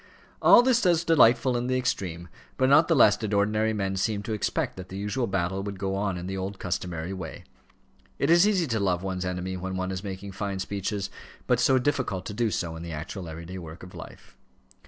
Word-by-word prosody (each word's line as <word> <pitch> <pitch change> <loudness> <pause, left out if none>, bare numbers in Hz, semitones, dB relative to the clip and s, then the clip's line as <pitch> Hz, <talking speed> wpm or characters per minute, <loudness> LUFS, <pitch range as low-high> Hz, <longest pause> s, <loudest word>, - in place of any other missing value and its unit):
All 240 - +8
this 245 -1 +3
was 170 -3 +3
delightful 130 -6 +4
in 120 +1 -1
the 130 0 +1
extreme; 90 -9 -2 0.3
but 130 0 +3
not 155 +4 +6
the 165 - +3
less 105 -6 +6
did 105 -1 -2
ordinary 105 +2 +2
men 95 -3 -2
seem 100 +1 -1
to 110 0 -3
expect 105 - -1
that 95 0 -8
the 95 - -7
usual 105 +5 -1
battle 95 0 -1
would 100 0 -5
go 95 0 -2
on 95 -2 -1
in 90 - -6
the 95 +1 -4
old 95 +1 -4
customary 90 -1 -3
way. 95 - -7 0.7
It 140 - +1
is 175 +4 +6
easy 190 -5 +2
to 115 -6 -1
love 90 -2 0
one's 95 -1 -3
enemy 90 +1 -3
when 95 +1 -4
one 95 0 -2
is 95 0 -4
making 100 0 -6
fine 100 0 -3
speeches; 100 +1 -3 0.3
but - - +2
so 130 - +4
difficult 130 -8 -1
to 105 - -5
do 115 +1 +1
so 85 -5 -3
in 80 - -7
the 85 0 -6
actual 80 +3 -6
everyday 85 +4 -7
work 80 0 -10
of 90 - -11
life. - - -12
100 Hz, 220 wpm, -27 LUFS, 95-120 Hz, 0.7 s, All